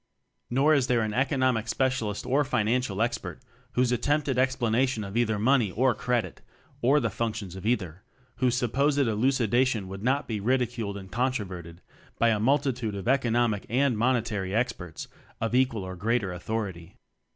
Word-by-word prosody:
Nor 140 +5 +3
is 135 -4 +2
there 120 -2 +2
an 110 -1 -2
Economic 130 -3 +1
Specialist 115 -4 -1
or 140 +3 +2
Financial 115 -3 0
Expert 120 0 -3 0.3
whose 125 0 +2
attempted 140 +3 +1
explanation 125 -2 +1
of 100 +1 -7
either 115 -3 +1
"money" 115 0 +3
or 125 +6 +2
"credit" 120 +1 -2 0.4
(or 135 +5 +4
the 115 -6 -1
functions 105 -4 -3
of 95 +3 -5
either) 95 -7 -1 0.4
whose 125 -1 +1
supposed 140 +4 +1
elucidation 120 -2 +1
would 95 +1 -7
not 135 +5 0
be 110 -3 -2
ridiculed 120 -2 -1
and 95 -1 -10
controverted 95 -10 -3 0.4
by 115 - +3
a 110 -2 +1
multitude 130 -3 +1
of 100 +1 -6
Economic 120 -5 +2
and 130 +2 +2
Mone 120 +1 +2
tary 100 -4 -3
Experts 110 -9 -3 0.3
of 115 +1 -2
equal 125 -5 +2
or 95 0 -6
greater 105 0 0
au 90 - -7
thority. 95 -5 -4
115 Hz, 160 wpm, -27 LUFS, 105-130 Hz, 0.4 s, or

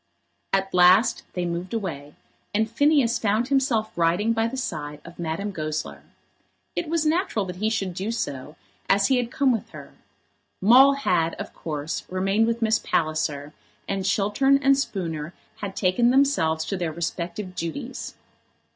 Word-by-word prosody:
At 195 0 0
last 185 +7 +5
they 180 -1 -2
moved 175 +4 -4
away, 150 -9 -5 0.4
and 220 +1 +2
Phineas 275 0 +2
found 220 +4 0
himself 255 -6 +1
riding 175 +7 +2
by 225 0 +1
the 260 +3 -5
side 150 - -4
of 170 +1 -12
Madame 170 +5 -3
Goesler. 155 -3 -4 0.7
It 330 - -2
was 325 -1 0
natural 310 - +1
that 180 -1 -7
he 215 +3 0
should 195 -5 -2
do 190 +5 -4
so, 145 - -4 0.3
as 195 0 +4
he 265 - +4
had 245 -1 -1
come 270 +1 +2
with 225 -4 -2
her. - - -11 0.7
Maule 255 +7 +7
had, 170 -12 0
of - - -7
course, 150 -1 -4
remained 195 +4 +1
with 230 0 -1
Miss 220 0 +3
Palliser, 150 -2 -1 0.3
and 195 -1 -2
Chiltern 210 +8 +2
and 275 0 +5
Spooner 170 - -3 0.2
had 195 -2 -6
taken 200 +6 +2
themselves 245 - +2
to 195 - -3
their 170 -3 -2
respective 170 +3 -4
duties. 165 -2 -5
195 Hz, 155 wpm, -24 LUFS, 170-235 Hz, 0.7 s, Maule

